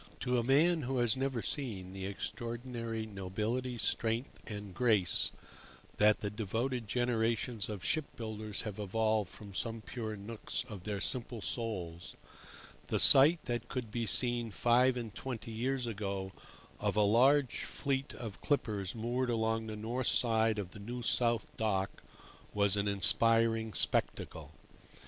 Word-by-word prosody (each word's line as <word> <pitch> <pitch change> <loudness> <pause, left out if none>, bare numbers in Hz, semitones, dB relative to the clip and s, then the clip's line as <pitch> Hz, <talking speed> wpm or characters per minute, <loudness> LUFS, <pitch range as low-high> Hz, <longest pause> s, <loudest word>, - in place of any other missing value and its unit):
To 125 -1 +1
a - - 0
man 155 +7 +4
who 130 0 -2
has 120 -1 +2
never 130 -3 -2
seen 100 -10 -4
the 95 0 -4
extraordinary 115 +2 -4
nobility, 110 +5 -3
strength, 115 +2 -1
and 105 -3 -6
grace 105 -6 +2 0.7
that 105 0 +4
the 100 - -2
devoted 115 +3 -2
generations 115 -1 0
of 100 -3 -5
ship 155 -2 +1
builders 110 -2 -4
have 105 -2 -6
evolved 110 0 0
from 100 -2 -11
some 115 +3 -3
pure 110 -1 -5
nooks 105 +2 -5
of 100 -5 -9
their 100 -2 -3
simple 120 -2 -2
souls, 95 -7 -4 0.7
the - - 0
sight 155 +5 +8
that 120 -1 -2
could 120 -4 -4
be 115 0 -2
seen 120 +2 +2
five 125 +5 +3
and 115 -4 -5
twenty 120 -3 -6
years 125 +3 -1
ago 100 -4 -3 0.5
of - - 0
a 105 - +4
large 125 +6 +4
fleet 135 -1 -2
of 110 -7 -7
clippers 105 -9 -1
moored 120 +3 -1
along 110 -1 0
the 110 - -5
north 115 +4 -2
side 110 -2 +2
of 95 -3 -4
the 105 - -11
New 120 +4 -6
South 115 -1 +1
Dock 100 -3 -1 0.5
was 100 -1 +3
an 100 0 0
inspiring 115 +2 +3
spectacle. - - +1
115 Hz, 145 wpm, -33 LUFS, 105-120 Hz, 0.7 s, sight